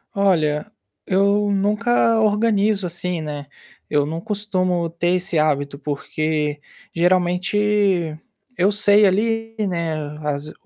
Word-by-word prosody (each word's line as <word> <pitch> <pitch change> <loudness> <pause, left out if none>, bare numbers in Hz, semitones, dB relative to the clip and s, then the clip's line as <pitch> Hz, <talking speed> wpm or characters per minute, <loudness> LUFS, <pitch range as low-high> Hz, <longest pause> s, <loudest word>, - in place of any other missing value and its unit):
Olha, 180 -1 +1 0.3
eu 200 +2 +2
nunca 220 +3 +2
organizo, 210 -2 +2
assim, 175 0 -3
né, 145 -2 -6 0.4
eu 145 -1 +2
não 160 +2 -4
costumo 185 -4 -1
ter 170 +1 -1
esse 180 -2 0
hábito, 145 -2 0
porque 150 +1 -2 0.3
geralmente 180 0 +1 0.4
eu 185 +3 +3
sei 205 0 +4
ali, 225 +3 0
né, 170 -3 -2 0.3
as 150 +1 -3
185 Hz, 105 wpm, -21 LUFS, 155-205 Hz, 0.4 s, sei